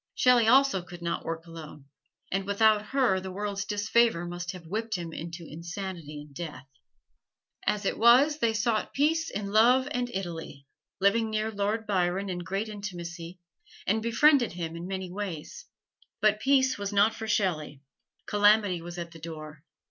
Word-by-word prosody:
Shelley 245 Hz, -3 st, +5 dB
also 265 Hz, -4 st, +5 dB
could 175 Hz, 0 st, -11 dB
not 170 Hz, -, -2 dB
work 165 Hz, 0 st, -4 dB
alone, 160 Hz, -4 st, -10 dB, 0.5 s
and 195 Hz, +1 st, 0 dB
without 210 Hz, +1 st, +3 dB
her 255 Hz, -8 st, +2 dB
the 190 Hz, 0 st, -7 dB
world's 200 Hz, +1 st, -3 dB
disfavor 210 Hz, -3 st, +2 dB
must 175 Hz, +1 st, -5 dB
have 180 Hz, -2 st, -11 dB
whipped 220 Hz, +6 st, -3 dB
him 170 Hz, -2 st, -5 dB
into 170 Hz, +1 st, -7 dB
insanity 170 Hz, -2 st, -7 dB
and 145 Hz, -1 st, -14 dB
death. 145 Hz, -5 st, -7 dB, 1.0 s
As 210 Hz, -1 st, 0 dB
it -, -, -1 dB
was 260 Hz, +7 st, +6 dB
they 230 Hz, -4 st, +2 dB
sought 220 Hz, 0 st, -1 dB
peace 320 Hz, +3 st, +2 dB
in 200 Hz, -1 st, -4 dB
love 245 Hz, +5 st, +5 dB
and 245 Hz, -4 st, -1 dB
Italy, 165 Hz, -, -6 dB, 0.3 s
living 220 Hz, +3 st, +3 dB
near 215 Hz, 0 st, -1 dB
Lord 210 Hz, +2 st, -1 dB
Byron 190 Hz, 0 st, 0 dB
in 180 Hz, -, -3 dB
great 195 Hz, +5 st, -3 dB
intimacy, 175 Hz, -4 st, -7 dB, 0.5 s
and 220 Hz, +3 st, +1 dB
befriended 245 Hz, +2 st, +4 dB
by -, -, -12 dB
him 165 Hz, -2 st, -4 dB
in 170 Hz, +1 st, -6 dB
many 190 Hz, -1 st, -4 dB
ways. 195 Hz, -, -6 dB, 0.5 s
But 215 Hz, 0 st, +3 dB
peace 265 Hz, -2 st, +3 dB
was 200 Hz, 0 st, -3 dB
not 205 Hz, +2 st, +4 dB
for 220 Hz, -, -6 dB
Shelley. 155 Hz, -9 st, -1 dB, 0.4 s
Calamity 205 Hz, -3 st, +3 dB
was 175 Hz, +1 st, -8 dB
at 170 Hz, -1 st, -6 dB
the 165 Hz, -, -12 dB
door. 155 Hz, -2 st, -9 dB
200 Hz, 165 wpm, -28 LUFS, 170-220 Hz, 1.0 s, was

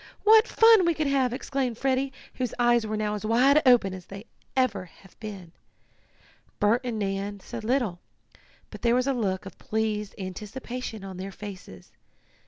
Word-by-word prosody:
"What 440 Hz, +2 st, +7 dB
fun 450 Hz, -3 st, +6 dB
we 340 Hz, -1 st, +2 dB
could 310 Hz, -, -1 dB
have!" 270 Hz, -3 st, +2 dB
exclaimed 255 Hz, -2 st, -2 dB
Freddie, 265 Hz, +1 st, 0 dB, 0.2 s
whose 250 Hz, -3 st, -3 dB
eyes 240 Hz, -2 st, +3 dB
were 215 Hz, 0 st, -2 dB
now 210 Hz, 0 st, -1 dB
as 210 Hz, -, -5 dB
wide 255 Hz, +7 st, +4 dB
open 235 Hz, -7 st, +5 dB
as 185 Hz, -2 st, -9 dB, 0.5 s
ever 205 Hz, -8 st, +1 dB
they -, -, -22 dB
had 195 Hz, -, -18 dB
been. 195 Hz, -6 st, -8 dB, 1.1 s
Bert 220 Hz, +4 st, +3 dB
and 240 Hz, -3 st, -3 dB
Nan 200 Hz, 0 st, -3 dB
said 230 Hz, +3 st, -8 dB
little, 230 Hz, -7 st, 0 dB, 0.7 s
but -, -, -10 dB
there 235 Hz, 0 st, +3 dB
was 250 Hz, 0 st, +2 dB
a 275 Hz, -, +1 dB
look 195 Hz, -7 st, -2 dB
of 195 Hz, -, -11 dB
pleased 215 Hz, -2 st, -2 dB
anticipation 215 Hz, +4 st, -6 dB
on 190 Hz, -2 st, -8 dB
their 190 Hz, +1 st, -6 dB
faces. 185 Hz, -, -10 dB
220 Hz, 170 wpm, -26 LUFS, 200-255 Hz, 1.1 s, What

